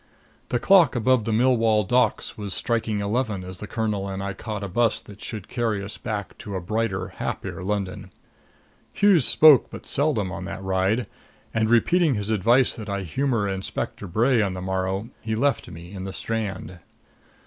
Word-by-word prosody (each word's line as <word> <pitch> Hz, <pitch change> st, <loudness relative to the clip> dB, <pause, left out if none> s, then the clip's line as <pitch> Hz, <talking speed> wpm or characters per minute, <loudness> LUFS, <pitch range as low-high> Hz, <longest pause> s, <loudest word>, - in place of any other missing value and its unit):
The 125 Hz, -, +1 dB
clock 170 Hz, +1 st, +5 dB
above 120 Hz, -1 st, +2 dB
the 115 Hz, -, -1 dB
Millwall 115 Hz, -2 st, +3 dB
Docks 125 Hz, -1 st, +1 dB
was 100 Hz, -3 st, -4 dB
striking 115 Hz, -3 st, -1 dB
eleven 105 Hz, -2 st, -1 dB
as 90 Hz, 0 st, -8 dB
the 105 Hz, -, -7 dB
colonel 105 Hz, -2 st, -2 dB
and 95 Hz, 0 st, -4 dB
I 100 Hz, 0 st, -3 dB
caught 105 Hz, +1 st, -5 dB
a -, -, -3 dB
bus 115 Hz, +5 st, +1 dB
that 105 Hz, -1 st, -14 dB
should 105 Hz, -4 st, -6 dB
carry 115 Hz, -5 st, -1 dB
us 100 Hz, -, -8 dB
back 105 Hz, -4 st, -4 dB
to 105 Hz, -5 st, -6 dB
a -, -, -1 dB
brighter, 95 Hz, +1 st, -2 dB
happier -, -, -5 dB
London. 100 Hz, -1 st, -3 dB, 0.8 s
Hughes 195 Hz, -, +4 dB
spoke 135 Hz, +5 st, +7 dB
but -, -, -10 dB
seldom 130 Hz, -10 st, 0 dB
on -, -, -5 dB
that 95 Hz, -1 st, -6 dB
ride; 95 Hz, +5 st, +1 dB, 0.5 s
and, 110 Hz, -1 st, +1 dB
repeating 155 Hz, +6 st, +3 dB
his 105 Hz, +1 st, -3 dB
advice 120 Hz, +5 st, +3 dB
that 110 Hz, -2 st, -7 dB
I 100 Hz, -1 st, -2 dB
humor 115 Hz, -, 0 dB
Inspector 95 Hz, +1 st, -4 dB
Bray 115 Hz, +6 st, +2 dB
on 100 Hz, -3 st, 0 dB
the -, -, -5 dB
morrow, 95 Hz, +3 st, -2 dB
he 110 Hz, -1 st, -2 dB
left 135 Hz, +2 st, 0 dB
me 85 Hz, +2 st, -10 dB
in 95 Hz, -1 st, -6 dB
the 95 Hz, -, -5 dB
Strand. 100 Hz, -6 st, -4 dB
110 Hz, 180 wpm, -24 LUFS, 95-120 Hz, 0.8 s, spoke